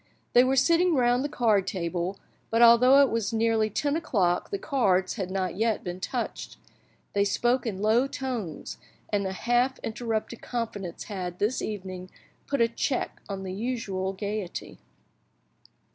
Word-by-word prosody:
They 245 - +7
were 260 +1 +2
sitting 335 +5 +4
round 245 0 +3
the 290 - -2
card 220 -8 +2
table, 180 +1 -2 0.3
but 230 +1 +4
although 250 +4 +7
it 275 - +1
was 230 -2 -1
nearly 225 -1 +2
ten 285 +7 0
o'clock 195 - 0
the 400 - -2
cards 195 - +1
had 190 -5 -4
not 185 -1 -2
yet 225 0 +1
been 180 0 -5
touched. - - -4 0.6
They 200 - +3
spoke 240 +4 +1
in 200 -2 -3
low 230 +5 +3
tones, 245 - -5 0.3
and 200 -2 0
a - - -3
half 245 +6 +1
interrupted 225 0 -3
confidence 210 -7 -4
had, 180 -4 -5
this 215 +7 0
evening, 185 -3 -5 0.4
put 280 -3 0
a 230 - +5
check 250 +3 -2
on 195 -1 -4
the 185 -1 -5
usual 200 -4 -2
gaiety. 200 -1 -5
220 Hz, 155 wpm, -27 LUFS, 190-245 Hz, 0.6 s, They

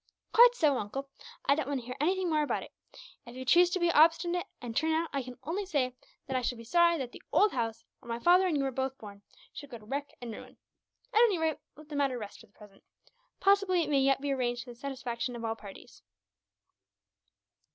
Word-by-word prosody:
"Quite 485 +1 +8
so, 290 - +2
uncle. 270 +7 -5 0.3
I - - +5
don't 295 -2 -2
want 280 -2 -1
to - - -14
hear 250 +1 -6
anything 370 +4 +1
more 310 -2 +2
about 295 - -1
it. - - -13 0.6
If 240 - -10
you 260 0 -7
choose 345 +6 +6
to 370 +1 -1
be 345 -1 +3
obstinate, 335 +3 +3
and 235 -2 -7
turn 320 +4 +1
out, 325 +1 -1
I 275 - 0
can 250 -1 -9
only 340 +9 -2
say 280 -9 -1 0.3
that 265 - -4
I 255 - +1
shall 245 0 -2
be 230 - -10
sorry 340 +7 +3
that 260 -4 -5
the - - -12
old 420 0 +4
house, 230 -2 -3 0.2
where 235 - -15
my 230 - -2
father 360 +8 +4
and 320 -5 +1
you 275 - 0
were 270 - -1
both 265 +1 -3
born, 200 -2 -11 0.3
should 285 - -9
go 240 - -8
to 215 - -17
wreck 285 +5 -4
and 235 -2 -6
ruin. - - -11 0.6
At 435 - +4
any 440 -6 +4
rate, 320 -2 -1 0.2
let 305 +2 -14
the 300 - -6
matter 275 -3 +1
rest, 210 -3 -8
for - - -16
the 205 - -36
present. 205 -2 -17 0.6
Possibly 390 -2 +3
it 300 - -4
may 280 - +4
yet 270 0 +2
be 285 0 -1
arranged 245 -2 -1
to 245 - -10
the - - -12
satisfaction 250 -2 -4
of 230 -1 -5
all 225 0 -1
parties." 200 -3 -13
275 Hz, 235 wpm, -30 LUFS, 245-335 Hz, 0.6 s, Quite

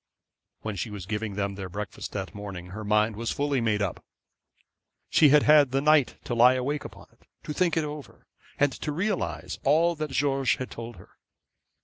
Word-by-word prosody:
When 110 -2 -4
she 105 +4 -3
was 100 -4 -7
giving 105 0 -3
them 100 -1 -2
their 95 -1 -6
breakfast 100 +2 -6
that 95 -3 -4
morning 95 -3 -8
her 110 +3 -6
mind 105 +1 +2
was 115 +1 -3
fully 140 -2 0
made 105 -2 +1
up. 95 - -4 1.1
She 150 - +6
had 150 +1 +6
had 150 -2 +6
the 135 +2 +1
night 150 -2 +3
to - - -4
lie 125 +2 +6
awake 140 +4 -2
upon - - -11
it, - - -29 0.2
to 150 - -5
think 175 0 +1
it 160 - +2
over, 150 -1 -8 0.3
and 145 -1 +3
to 150 - -4
realise 185 +5 -2
all 165 +5 +3
that 155 -2 -4
George 135 -1 +1
had 130 - -6
told 115 0 -7
her. 90 - -18
125 Hz, 195 wpm, -27 LUFS, 105-150 Hz, 1.1 s, She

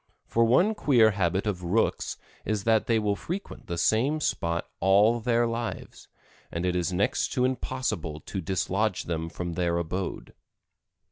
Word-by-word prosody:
For 115 - +2
one 175 - +4
queer 120 - +4
habit 95 -1 0
of 100 -4 -2
Rooks 90 +6 0 0.3
is 105 -1 -1
that 110 0 +2
they 115 - +3
will 105 -2 +1
frequent 180 - -6
the 85 - -3
same 125 - +2
spot 85 - -1
all 105 +5 +4
their 120 +1 +2
lives, 115 0 -5 0.4
and 85 +2 -2
it 90 0 0
is 90 +1 0
next 95 +3 +1
to 125 -2 +2
impossible 125 -12 -2
to 95 - -5
dislodge 95 +3 0
them 80 -1 -3
from 85 0 -5
their 85 0 0
abode. 90 +3 -4
100 Hz, 155 wpm, -27 LUFS, 90-115 Hz, 0.4 s, one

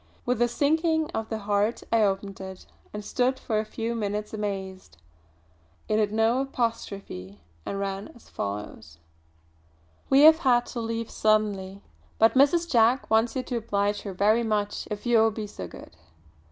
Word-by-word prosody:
With 245 -1 0
a 240 - +5
sinking 315 +5 +1
of 220 0 -4
the 220 - -2
heart 205 +2 0
I 230 -1 +4
opened 195 -1 -1
it, 190 -1 -9 0.3
and 210 0 -7
stood 255 +3 +1
for 220 -4 -1
a 215 - -2
few 225 +2 -4
minutes 210 -1 -3
amazed. 190 - -5 0.9
It 215 - +1
had 210 -1 +1
no 225 +4 +2
apostrophe 200 - -4 0.3
and 195 - -3
ran 195 0 -3
as 240 - -18
follows: 100 -6 -6 1.1
"We 270 +1 +6
have 315 +1 +8
had 245 -5 +3
to 240 - -3
leave 230 0 -3
suddenly, 205 -3 0 0.3
but 225 +1 +5
Mrs. 290 +6 +4
Jack 240 -3 +3
wants 225 +1 +3
you 260 - -1
to 245 - -3
oblige 205 -2 -1
her 200 - -6
very 215 +5 +3
much 210 -2 -1
if 210 +1 -5
you 240 -2 +4
will 225 0 +5
be 220 0 -5
so 95 - -8
good. - - -13
220 Hz, 165 wpm, -26 LUFS, 200-240 Hz, 1.1 s, have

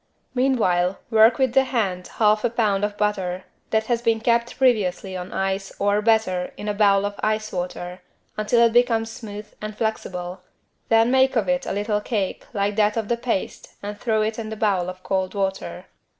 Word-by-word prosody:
Meanwhile 195 -9 +2
work 225 +1 +6
with 260 -3 +1
the 270 0 +4
hand 195 -8 -1
1/2 215 +2 +2
lb. 205 -4 +1
of 205 0 -2
butter 190 -3 -1 0.3
that 220 0 +2
has 235 0 0
been 230 -1 +2
kept 235 +1 +1
previously 200 -7 +1
on 180 0 -6
ice 195 0 -2
or, 205 +1 +2
better, 210 -5 +1
in 210 - -6
a 210 - 0
bowl 200 -1 +3
of 205 0 -5
ice 215 0 -1
water, 180 0 -5 0.3
until 235 +3 +3
it 230 - +2
becomes 230 -2 +2
smooth 210 -2 -9
and 215 0 -6
flexible, 185 -5 -3 0.5
then 225 +1 +4
make 265 0 +3
of 215 -5 +1
it 180 0 0
a - - -2
little 210 +1 -1
cake 205 -4 -2
like 205 -2 -1
that 210 +1 +2
of 220 -2 -2
the 235 - +2
paste 235 -5 -3
and 205 0 -6
throw 220 -2 +1
it 220 +1 -2
in 220 -1 -5
a - - -4
bowl 195 -5 +1
of 185 0 -9
cold 190 0 -1
water. 195 -1 -3
210 Hz, 190 wpm, -23 LUFS, 195-225 Hz, 0.5 s, work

